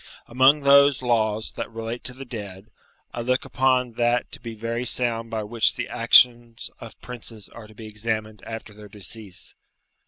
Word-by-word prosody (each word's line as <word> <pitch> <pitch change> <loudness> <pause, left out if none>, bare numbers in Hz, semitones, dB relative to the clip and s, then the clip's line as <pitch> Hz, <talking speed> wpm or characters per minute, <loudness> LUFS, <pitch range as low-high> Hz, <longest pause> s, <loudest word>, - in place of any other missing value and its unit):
Amongst 135 +4 +3
those 140 -1 +5
laws 110 -3 0
that - - -6
relate 115 +1 -7
to 125 - -3
the 135 +1 -9
dead, 105 -3 -9 0.4
I 120 - -4
look 130 +2 -1
upon 130 -1 +1
that 120 0 0
to - - -10
be 115 -1 -8
very 115 +2 -4
sound 115 -2 +5
by 110 -1 -4
which 110 +2 0
the - - -4
actions 120 -2 +3
of - - -12
princes 115 -4 -8
are 115 -2 -13
to 110 - -18
be 110 - -11
examined 110 -1 -4
after 115 -1 -9
their 105 0 -14
decease. 105 -1 -10
115 Hz, 175 wpm, -23 LUFS, 110-125 Hz, 0.4 s, those